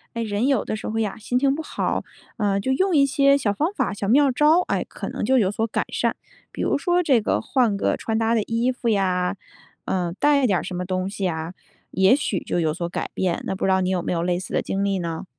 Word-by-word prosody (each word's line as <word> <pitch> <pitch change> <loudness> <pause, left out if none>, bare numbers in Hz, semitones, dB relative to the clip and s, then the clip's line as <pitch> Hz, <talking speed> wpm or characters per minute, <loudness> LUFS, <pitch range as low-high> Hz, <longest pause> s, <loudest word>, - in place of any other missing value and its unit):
哎， 230 - -2
人 215 +3 -1
有 275 -2 +2
的 - - -3
时 - - -6
候 225 +1 -1
呀， 210 -3 -2
心 225 +3 -3
情 275 0 +3
不 - - -4
好， 315 - -2 0.3
呃， 200 -3 0
就 230 - -2
用 375 +6 +1
一 280 - +6
些 275 0 +4
小 220 -7 0
方 310 - -1
法、 - - -1
小 200 0 -4
妙 275 +6 +4
招， 300 +6 +4
哎， - - 0
可 - - -6
能 - - -4
就 260 +4 +3
有 195 -5 +2
所 220 +2 -1
改 225 - -2
善。 - - 0 0.4
比 - - -4
如 - - +1
说 350 +4 +1
这 275 -9 +3
个 210 - 0
换 225 -3 +1
个 - - 0
穿 225 - -2
搭 225 0 +1
的 230 - +3
衣 230 +2 0
服 250 -2 -3
呀， 185 -3 +1 0.5
呃， 180 -2 -1
带 285 -2 +4
一 - - +5
点 200 -5 +2
儿 - - -6
什 - - -6
么 180 +1 -3
东 185 +1 -2
西 200 - -4
呀， 165 -1 -2 0.4
也 190 +5 +4
许 265 -8 -1
就 175 - -1
有 155 -2 +1
所 170 +1 -4
改 - - -4
变， 180 -2 -1
那 190 - -3
不 - - -3
知 190 - +2
道 190 - +3
你 185 0 0
有 180 -2 0
没 - - -1
有 170 -1 -1
类 175 0 0
似 185 - -7
的 - - +1
经 195 +1 -2
历 195 -2 0
呢？ 165 -2 -4
210 Hz, 290 characters per minute, -23 LUFS, 185-260 Hz, 0.5 s, 一